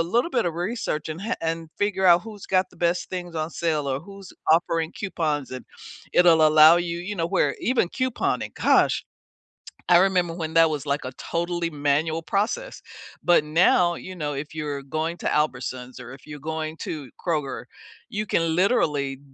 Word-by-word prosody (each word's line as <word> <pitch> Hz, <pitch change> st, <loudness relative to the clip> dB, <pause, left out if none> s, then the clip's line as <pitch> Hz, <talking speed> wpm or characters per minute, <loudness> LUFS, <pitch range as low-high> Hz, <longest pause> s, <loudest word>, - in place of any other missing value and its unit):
little 240 Hz, -, 0 dB
bit 240 Hz, -3 st, +1 dB
of 165 Hz, -, -2 dB
research 175 Hz, -4 st, -3 dB
and 155 Hz, +3 st, -5 dB
ha 225 Hz, +5 st, -2 dB
and 165 Hz, -1 st, -3 dB
figure 205 Hz, -2 st, 0 dB
out 175 Hz, 0 st, +6 dB
who's 215 Hz, -3 st, -10 dB
got 185 Hz, 0 st, +2 dB
the -, -, -20 dB
best 175 Hz, +1 st, 0 dB
things 175 Hz, -2 st, -5 dB
on 155 Hz, 0 st, -2 dB
sale 155 Hz, -4 st, -1 dB
or 135 Hz, 0 st, -1 dB
who's 195 Hz, +1 st, -12 dB, 0.2 s
offering 165 Hz, 0 st, +2 dB
coupons, 155 Hz, -8 st, -2 dB
and 130 Hz, 0 st, -7 dB, 0.5 s
it'll 165 Hz, -3 st, +6 dB
allow 155 Hz, +2 st, +8 dB
you 170 Hz, -1 st, -2 dB
You 195 Hz, +4 st, -5 dB
know, 165 Hz, -1 st, 0 dB
where 145 Hz, -4 st, +1 dB
even 245 Hz, -7 st, +1 dB
couponing, 255 Hz, +4 st, -2 dB
gosh, -, -, +3 dB, 0.9 s
I 175 Hz, -, +8 dB
remember 180 Hz, -2 st, +2 dB
when 160 Hz, -2 st, -5 dB
that 165 Hz, 0 st, +6 dB
was 150 Hz, -2 st, -4 dB
like 140 Hz, +1 st, -1 dB
a 130 Hz, -, -4 dB
totally 170 Hz, +3 st, -2 dB
manual 150 Hz, +2 st, 0 dB
process. 220 Hz, -, -2 dB, 0.4 s
But 175 Hz, -3 st, +4 dB
now, 175 Hz, +2 st, +3 dB
you 185 Hz, 0 st, -8 dB
know, 150 Hz, -3 st, -3 dB
if 145 Hz, +3 st, -6 dB
you're 145 Hz, -2 st, -4 dB
going 160 Hz, +5 st, -3 dB
to -, -, -10 dB
Albertsons 130 Hz, -4 st, -2 dB
or 125 Hz, 0 st, -9 dB
if 135 Hz, -, -14 dB
you're 150 Hz, -1 st, -9 dB
going 160 Hz, +1 st, -4 dB
to 145 Hz, -6 st, -6 dB, 0.2 s
Kroger, 150 Hz, -6 st, -2 dB, 0.4 s
you 210 Hz, +1 st, -3 dB
can 165 Hz, -4 st, 0 dB
literally 150 Hz, -, +1 dB
165 Hz, 180 wpm, -24 LUFS, 150-180 Hz, 0.9 s, allow